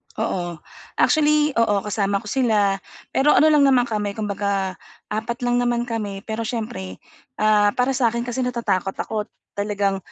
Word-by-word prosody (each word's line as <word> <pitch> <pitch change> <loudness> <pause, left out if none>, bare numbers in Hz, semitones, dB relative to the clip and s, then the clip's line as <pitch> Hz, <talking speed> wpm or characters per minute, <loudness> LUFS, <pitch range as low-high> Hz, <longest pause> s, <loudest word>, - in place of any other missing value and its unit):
Oo, 175 -7 -3 0.3
actually, 300 -1 +3
oo 205 -3 +2
kasama 200 0 -1
ko 210 - -7
sila, 210 -7 +2 0.3
pero 290 +3 +3
ano 310 +1 +6
lang 290 -2 +5
naman 255 -2 +5
kami 210 -4 -2
kung 210 -2 -3
baga 195 -2 -1 0.3
4 235 +4 -3
lang 245 0 +2
naman 240 -1 +1
kami. 210 -4 -4
Pero 220 0 -4
siyempre, 95 - -5 0.3
ah, 210 +1 +3
para 250 +2 +1
sa 255 -2 +2
akin 235 - -1
kasi 245 +1 -5
natatakot 195 -6 -1
ako 215 -1 -3 0.3
talagang 200 -1 0
220 Hz, 160 wpm, -22 LUFS, 200-245 Hz, 0.3 s, ano